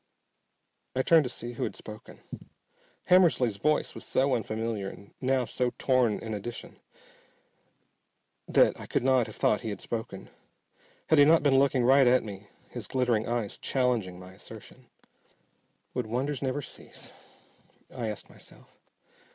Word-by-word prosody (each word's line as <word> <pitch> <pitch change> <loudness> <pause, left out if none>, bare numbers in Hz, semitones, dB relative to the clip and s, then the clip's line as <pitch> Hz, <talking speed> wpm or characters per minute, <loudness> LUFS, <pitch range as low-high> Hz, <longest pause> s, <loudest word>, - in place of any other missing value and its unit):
I 130 - +1
turned 160 -1 +5
to - - -3
see 120 0 -6
who - - -4
had - - -3
spoken. 110 0 -11 0.9
Hammersly's 155 - +4
voice 150 +8 +1
was - - -8
so 135 +1 +1
unfamiliar 110 -3 -2
and 100 +1 -14
now 130 -1 +1
so 125 +1 -1
torn 125 -5 +2
in 110 -1 -6
addition 110 +3 -7 1.7
that - - +3
I - - -9
could - - -1
not 130 -3 +3
have - - -10
thought 105 - +1
he 110 - -4
had 100 - -5
spoken, 110 -4 -6 0.8
had 160 - +5
he - - +9
not 160 0 +5
been 135 -2 +4
looking 135 -2 +2
right 135 +1 +5
at 125 +1 +4
me, 100 -1 -9 0.2
his - - -8
glittering 120 -4 0
eyes 115 -3 -3
challenging 120 -9 -1
my 90 0 -11
assertion. 110 +5 -13 1.1
Would 125 -3 -2
wonders 130 +4 -2
never 140 +1 -2
cease? - - -10 0.8
I 120 -3 -3
asked 105 - -6
myself. - - -14
125 Hz, 150 wpm, -28 LUFS, 110-135 Hz, 1.7 s, he